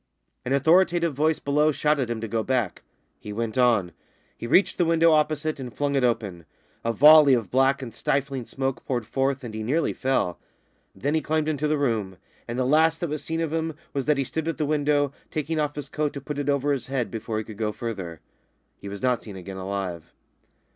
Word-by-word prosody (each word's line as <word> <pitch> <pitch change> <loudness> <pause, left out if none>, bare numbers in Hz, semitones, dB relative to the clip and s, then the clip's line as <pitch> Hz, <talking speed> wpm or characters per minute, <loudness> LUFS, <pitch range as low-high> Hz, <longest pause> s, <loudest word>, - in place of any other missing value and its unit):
An 125 - -4
authoritative 170 +3 +3
voice 155 +3 +1
below 150 +2 +2
shouted 150 -3 +1
to - - -4
him 110 - -7
to 115 - -3
go 115 +1 -1
back. 120 -5 -1 0.4
He 105 - -8
went 110 +1 -3
on. 115 -8 +3 0.4
He 115 - -6
reached 185 +11 +3
the 175 - +4
window 165 0 +4
opposite 155 0 +1
and 125 -2 -6
flung 145 +5 -1
it 135 -2 +1
open. 100 -8 -1 0.4
A 115 - +1
volley 145 +3 +8
of 115 -5 -3
black 135 +1 +2
and 115 -3 -7
stifling 135 0 -2
smoke 135 -1 -3
poured 120 -4 -2
forth 135 +2 -1
and 115 -3 -7
he 110 - -4
nearly 145 +9 0
fell. 130 -10 -1 0.6
Then 140 +10 -1
he 160 - +2
climbed 155 0 0
into 150 -1 0
the 155 0 +1
room, 110 -9 -1 0.3
and 120 +1 -4
the 130 - +1
last 160 +4 +3
that 170 -4 -2
was 150 - -3
seen 165 0 -2
of 160 -1 -2
him 160 -1 -2 0.2
was 135 -2 -2
that 150 -1 +2
he 135 - +1
stood 160 +4 -4
at 165 - -2
the 155 - 0
window, 145 -1 +1 0.2
taking 155 +1 -2
off 150 -1 -1
his 145 - -5
coat 150 -1 -2
to 140 - -5
put 145 +1 -5
it 145 0 -2
over 145 0 +1
his 135 - -4
head 125 -6 -2
before 110 0 -4
he 110 - -2
could 110 -1 -11
go 110 -1 0
further. 100 -7 -6 0.6
He 100 - -8
was 100 0 -8
not 125 -2 +2
seen 105 -3 -10
again 95 +1 -8
alive. 95 -3 -4
135 Hz, 225 wpm, -25 LUFS, 115-150 Hz, 0.6 s, volley